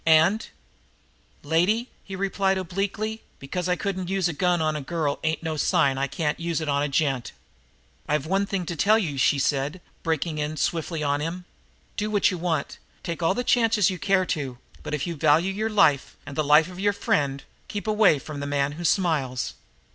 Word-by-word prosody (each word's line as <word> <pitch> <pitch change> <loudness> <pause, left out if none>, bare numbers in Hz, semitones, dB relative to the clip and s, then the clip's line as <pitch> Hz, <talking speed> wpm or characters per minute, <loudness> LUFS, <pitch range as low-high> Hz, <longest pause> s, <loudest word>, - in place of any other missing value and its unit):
"And 165 +7 +4 0.5
" - - -37 0.2
"Lady," 185 - +1
he 195 - -7
replied 195 0 +1
obliquely, 200 +4 -3 0.2
"because 180 +6 -4
I 180 - +3
couldn't 185 -2 -3
use 190 -2 +1
a 170 - -2
gun 180 +2 +1
on 155 -1 0
a 150 - -3
girl 150 0 -2
ain't 160 +1 -1
no 160 -1 -2
sign 140 -2 +3
that - - -2
I 140 - +1
can't 150 +3 -2
use 170 -1 -1
it 155 - -4
on 140 0 +1
a 145 - +1
gent!" 135 -3 0 0.7
"I've 150 -1 0
one 195 +4 +1
thing 195 -3 -2
to 170 - -4
tell 210 +8 +4
you," 155 -11 -2
she 140 - +4
said, 140 +4 0 0.2
breaking 160 -1 -1
in 150 +1 -2
swiftly 165 -1 -1
on 145 0 +1
him. 175 +3 -4 0.5
"Do 210 +1 -1
what 205 -1 +3
you 180 - -4
want 165 -4 -2 0.2
take 170 0 -4
all 165 +3 +2
the 245 - -1
chances 225 -6 +3
you 185 - -5
care 190 +1 +2
to 135 -8 -3 0.2
but, 150 - -3
if 150 - -3
you 170 - -3
value 160 +5 +3
your 215 +3 -1
life 155 -11 +3
and 140 - -8
the 155 - +1
life 150 +2 +5
of 180 0 -10
your 205 +1 +2
friend, 140 -8 0 0.2
keep 205 - -5
away 210 -7 +4
from 145 +1 -7
the 145 - -4
man 145 0 0
who 165 +4 -7
smiles." 155 -8 0
165 Hz, 210 wpm, -25 LUFS, 145-190 Hz, 0.7 s, life